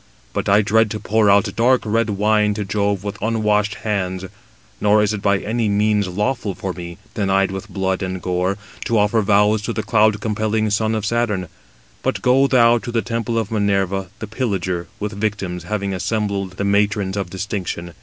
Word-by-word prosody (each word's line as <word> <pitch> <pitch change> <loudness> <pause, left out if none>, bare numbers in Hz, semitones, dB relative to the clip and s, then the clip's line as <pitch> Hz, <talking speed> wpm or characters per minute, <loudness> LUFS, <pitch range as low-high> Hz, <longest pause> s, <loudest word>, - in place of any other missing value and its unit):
But - - -2
I 100 +2 +5
dread 110 +1 +3
to 105 - -4
pour 110 -1 +2
out 100 0 +3
dark 125 +2 +3
red 115 +1 +1
wine 105 +1 +2
to 105 -1 -3
Jove 100 -1 -1
with 100 -1 -6
unwashed 105 -1 +1
hands: 95 -3 -1 0.6
nor 105 0 +4
is 105 +1 +1
it 105 - -4
by 100 -1 +3
any 110 +2 -1
means 105 0 +2
lawful 105 +2 -2
for 95 -1 -4
me, 85 -1 -8 0.2
denied 95 -2 +1
with 95 0 -6
blood 95 -1 -1
and 95 0 -3
gore, 90 +2 -1 0.3
to 115 -2 +1
offer 105 +2 +3
vows 105 +1 +3
to 105 - -3
the 110 - -2
cloud 110 -1 +3
compelling 110 0 0
son 110 +2 +1
of 110 -1 -2
Saturn. 105 -5 0 0.5
But - - -2
go 130 +2 +4
thou 120 -3 +5
to 120 - -6
the 115 -1 0
temple 115 0 -2
of 110 -1 -1
Minerva 100 -3 0
the 110 - -5
pillager, 95 -7 -2
with 105 0 -3
victims, 100 -4 -3
having 100 0 -2
assembled 100 -1 -2
the 100 +2 -3
matrons 100 -1 +1
of 100 -3 -3
distinction. 95 -3 -4
105 Hz, 185 wpm, -20 LUFS, 95-110 Hz, 0.6 s, I